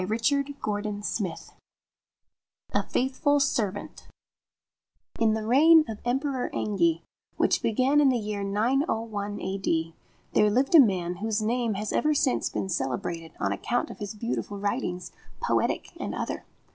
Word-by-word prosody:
64 265 -1 0 0.2
X 205 +2 -2 1.5
A - - +3
FAITHFUL 270 +3 +1
SERVANT1 210 -8 -2 1.1
IN 225 -2 +3
the 220 -1 -3
reign 310 +7 +6
of 220 -2 -5
the - - -10
Emperor 265 0 -1
Engi, 170 -5 +1 0.3
which - - +2
began 260 +6 +3
in 280 - +5
the 255 - +2
year 210 -2 -3
901 215 - -1
A.D., 170 -4 -1 0.4
there 210 - +4
lived 260 +8 +1
a 330 - +10
man 180 -8 +3
whose 215 +2 -1
name 230 -1 0
has 210 +1 -3
ever 305 0 +2
since 275 -3 +1
been - - -3
celebrated 160 +1 -3
on 100 - 0
account 240 - -1
of - - -11
his 205 0 -5
beautiful 210 -2 -3
writings, 200 -3 -2 0.3
poetic - - 0
and - - -4
other. - - -4
215 Hz, 140 wpm, -27 LUFS, 195-260 Hz, 1.5 s, a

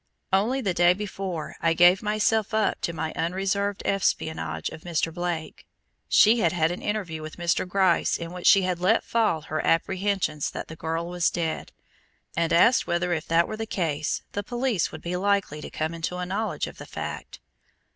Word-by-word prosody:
Only 230 +8 +2
the 195 -6 0
day 175 +1 +5
before 190 -4 -5
I 165 0 +2
gave 175 +2 +6
myself 215 +1 +1
up 220 -1 +1
to - - -1
my 160 -1 -4
unreserved 195 +3 -1
espionage 120 - -1
of - - -10
Mr. 165 -1 -1
Blake, 175 -2 -4 0.4
she 225 +3 +6
had 170 -6 +3
had 165 -2 +2
an 175 - -5
interview 190 -7 -3
with 155 0 -8
Mr. 175 +1 0
Gryce 185 -1 +2
in 170 0 -6
which 180 -1 -2
she 195 -2 +7
had 180 -1 -1
let 185 +6 +3
fall 220 -9 +1
her 155 +1 -3
apprehensions 185 -3 0
that - - -7
the 160 - -7
girl 165 +1 -3
was 175 -1 +1
dead, 165 -2 -3 0.6
and 165 0 0
asked 230 +9 +5
whether 175 +1 0
if 160 -1 -3
that 165 +1 +3
were 215 - -5
the 225 0 -4
case, 155 -7 -1
the 205 - -2
police 240 -2 -1
would 155 - -9
be 175 +1 -3
likely 195 -5 0
to - - -7
come 155 +1 -3
into 165 +2 -3
a 180 - -3
knowledge 205 +4 -2
of - - -10
the - - -9
fact. - - -6
180 Hz, 190 wpm, -26 LUFS, 165-200 Hz, 0.6 s, she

